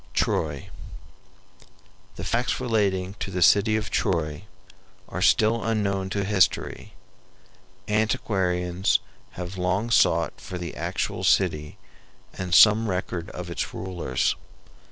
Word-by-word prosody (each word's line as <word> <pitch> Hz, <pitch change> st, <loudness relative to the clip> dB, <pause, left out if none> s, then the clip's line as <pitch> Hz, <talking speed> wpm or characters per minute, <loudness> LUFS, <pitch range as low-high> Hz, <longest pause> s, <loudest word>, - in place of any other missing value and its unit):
TROY 75 Hz, -3 st, -1 dB, 1.4 s
The -, -, -7 dB
facts 120 Hz, +2 st, -1 dB
relating 100 Hz, -6 st, 0 dB
to -, -, -4 dB
the 90 Hz, -2 st, +1 dB
city 105 Hz, +4 st, +5 dB
of 110 Hz, -1 st, -3 dB
Troy 80 Hz, 0 st, -1 dB, 0.6 s
are -, -, -5 dB
still 110 Hz, +2 st, +3 dB
unknown 100 Hz, -4 st, -1 dB
to 100 Hz, 0 st, -1 dB
history. 95 Hz, -2 st, 0 dB, 0.9 s
Antiquarians 95 Hz, -4 st, +1 dB, 0.3 s
have 90 Hz, +1 st, -6 dB
long 95 Hz, +6 st, 0 dB
sought -, -, +2 dB
for 90 Hz, -, -6 dB
the 85 Hz, -1 st, -6 dB
actual -, -, -3 dB
city 75 Hz, 0 st, +1 dB, 0.6 s
and 90 Hz, -1 st, -1 dB
some 110 Hz, +1 st, +7 dB
record 90 Hz, -2 st, -3 dB
of 90 Hz, -1 st, -7 dB
its 85 Hz, -, -4 dB
rulers. 90 Hz, -8 st, -1 dB
95 Hz, 115 wpm, -25 LUFS, 90-105 Hz, 1.4 s, some